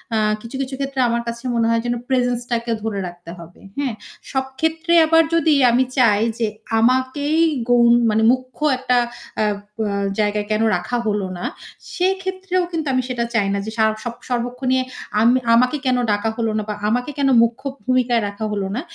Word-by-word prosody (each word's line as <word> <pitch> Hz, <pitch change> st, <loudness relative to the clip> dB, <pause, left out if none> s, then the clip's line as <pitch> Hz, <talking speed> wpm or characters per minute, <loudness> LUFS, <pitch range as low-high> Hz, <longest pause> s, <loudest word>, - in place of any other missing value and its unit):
আ -, -, +2 dB, 0.2 s
কিছু, 230 Hz, +4 st, -9 dB
কিছু, 265 Hz, 0 st, -4 dB
ক্ষেত্রে 275 Hz, -1 st, -3 dB
আমার 235 Hz, 0 st, 0 dB
কাছে 235 Hz, 0 st, -5 dB
মনে 230 Hz, -1 st, +2 dB
হয় 230 Hz, 0 st, +2 dB
যেন 240 Hz, -, 0 dB
প্রেজেন্সটাকে 245 Hz, -2 st, -1 dB
ধরে 215 Hz, -3 st, -2 dB
রাখতে 175 Hz, -1 st, -10 dB
হবে। 170 Hz, +1 st, -13 dB, 0.2 s
হ্যাঁ? 270 Hz, -5 st, -1 dB, 0.4 s
সব 265 Hz, -1 st, 0 dB
ক্ষেত্রে 320 Hz, +2 st, 0 dB
আবার 325 Hz, +1 st, +5 dB
যদি 325 Hz, -2 st, +3 dB, 0.2 s
আমি 250 Hz, +2 st, +3 dB
চাই 215 Hz, -5 st, +4 dB, 0.2 s
যে 225 Hz, -, +1 dB, 0.3 s
আমাকেই 260 Hz, +6 st, +1 dB, 0.3 s
গউন 235 Hz, -1 st, +5 dB, 0.2 s
মানে 220 Hz, +1 st, +2 dB
মুখ্য 255 Hz, +2 st, -4 dB, 0.2 s
একটা 250 Hz, -1 st, +1 dB, 0.4 s
আ -, -, +3 dB, 0.3 s
বা 220 Hz, -2 st, -1 dB, 0.3 s
জায়গায় 210 Hz, 0 st, 0 dB
কেন 215 Hz, +1 st, +1 dB
রাখা 180 Hz, +8 st, -2 dB
হলো 205 Hz, -3 st, -1 dB
না, 175 Hz, -, -5 dB, 0.5 s
সেক্ষেত্রেও 375 Hz, 0 st, -1 dB
কিন্তু 320 Hz, -3 st, -3 dB
আমি 255 Hz, -, +2 dB
সেটা 245 Hz, -2 st, -1 dB
চাই 210 Hz, -4 st, +2 dB
না 200 Hz, -, -1 dB
যে 220 Hz, -, -5 dB
সা 220 Hz, -, +3 dB, 0.2 s
সব 240 Hz, -2 st, -4 dB, 0.2 s
সর্বক্ষনে 250 Hz, +1 st, 0 dB, 0.4 s
আম 230 Hz, -, +5 dB, 0.3 s
আমাকে 250 Hz, +5 st, +3 dB
কেন 255 Hz, -1 st, +2 dB
ডাকা 205 Hz, +2 st, 0 dB
হলো 225 Hz, -2 st, 0 dB
না 215 Hz, -, -1 dB
বা -, -, -1 dB, 0.2 s
আমাকে 245 Hz, +5 st, -1 dB
কেন 280 Hz, -1 st, +2 dB
মুখ্য 235 Hz, +2 st, -2 dB, 0.2 s
ভূমিকায় 250 Hz, -2 st, +2 dB
রাখা 205 Hz, +2 st, -5 dB
হলো 200 Hz, -2 st, -2 dB
না। 250 Hz, -, -2 dB
245 Hz, 180 wpm, -20 LUFS, 220-265 Hz, 0.5 s, আবার